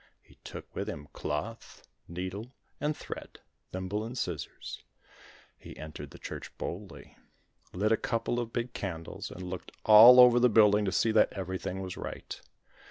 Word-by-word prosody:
He - - -23
took - - -9
with - - -3
him 75 0 -7
cloth, 80 +11 -5 0.2
needle 95 +8 -6 0.3
and 150 0 -1
thread, - - -8 0.3
thimble 95 +3 -3
and 120 +3 -6
scissors. 85 - -5 0.8
He - - -11
entered 75 0 -8
the - - -13
church - - -7
boldly, 95 +1 -7 0.6
lit 105 +4 0
a 110 - +4
couple 115 +2 -1
of 115 -1 -4
big 120 0 -3
candles, 85 -4 -5
and 90 - -8
looked 90 0 -6
all 115 +4 +10
over 125 -1 +8
the 125 0 +5
building 105 -1 +5
to 95 - 0
see 115 - +2
that 110 - +4
everything 95 0 -4
was 95 -1 -6
right. - - -7
105 Hz, 160 wpm, -30 LUFS, 90-115 Hz, 0.8 s, all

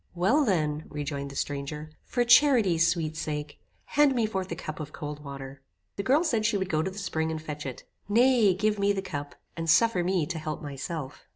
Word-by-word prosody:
"Well 220 - +3
then," 155 - 0
rejoined 145 -1 -4
the 140 - -10
stranger, 145 +2 -4
"for 245 - +1
charity's 235 - +5
sweet 160 -3 -1
sake, 150 -1 -4 0.3
hand 290 -2 +3
me 235 -2 +2
forth 190 -4 -3
a - - -1
cup 155 -1 -6
of 155 -1 -6
cold 150 0 -7
water." 135 -1 -8 0.3
The - - -2
girl 275 - +3
said 235 -10 +1
she 215 -1 +2
would 190 -1 -2
go 155 -1 +2
to 190 - -1
the 190 - -11
spring 160 -5 -1
and 160 -1 -3
fetch 150 -2 -6
it. 130 - -7 0.3
"Nay, 230 -3 +5
give 210 +2 0
me 200 0 +3
the 195 -1 -3
cup, 145 -6 -6 0.2
and 165 -1 -3
suffer 190 +1 +4
me 180 -3 +1
to 165 0 -4
help 155 -1 -4
myself. 145 -1 -6
165 Hz, 210 wpm, -28 LUFS, 150-205 Hz, 0.3 s, charity's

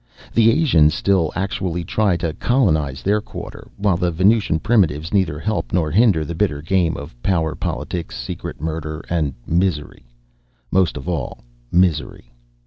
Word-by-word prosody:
The 115 -1 +5
Asians 100 - +4
still 95 -4 +1
actually 95 -3 -2
try 100 +1 +1
to 85 -2 -2
colonize 80 - +1
their 105 +2 +2
quarter, - - -9
while 100 -3 +1
the 90 0 +1
Venusian 95 +1 +2
primitives 85 -5 +1
neither 90 -7 +1
help 110 +7 -2
nor 80 -4 +1
hinder 95 -6 +3
the 85 - -5
bitter 80 -4 0
game 85 +1 +1
of 70 0 -8
power 80 -3 +1
politics, 85 -8 -4
secret - - -6
murder, 80 0 -4
and 75 -6 0
misery 85 -3 -1 0.7
most 90 -5 +2
of 70 - -8
all, 85 -7 -3 0.3
misery. 80 -8 0
85 Hz, 145 wpm, -20 LUFS, 75-100 Hz, 0.7 s, The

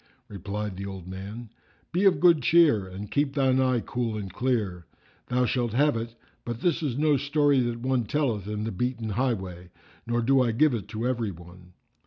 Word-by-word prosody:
Replied 100 0 -5
the 100 - -5
old 95 -2 -8
man, 100 +5 -8 0.4
"Be 180 +4 +1
of 195 - +5
good 170 -4 +5
cheer 145 - +4
and 95 +3 -8
keep 145 -1 0
thine 130 -2 +3
eye 130 -2 +2
cool 115 -2 -3
and 95 -3 -6
clear: 105 - -1 0.4
thou 125 0 +1
shalt 120 -2 -1
have 145 +2 +3
it; 115 +1 -4 0.3
but 120 0 -5
this 175 -1 +1
is 135 -6 -2
no 150 -1 +3
story 145 0 +2
that 120 -1 -1
one 130 -2 0
telleth 115 -6 -1
in 105 0 -3
the 110 - -3
beaten 120 +2 -2
highway, 95 -7 -2 0.4
nor 120 0 0
do 135 +2 +4
I 120 -3 +1
give 150 +4 +3
it 110 -6 -4
to 115 +2 -3
every 120 -4 -1
one." 90 0 -13
120 Hz, 195 wpm, -26 LUFS, 100-130 Hz, 0.4 s, of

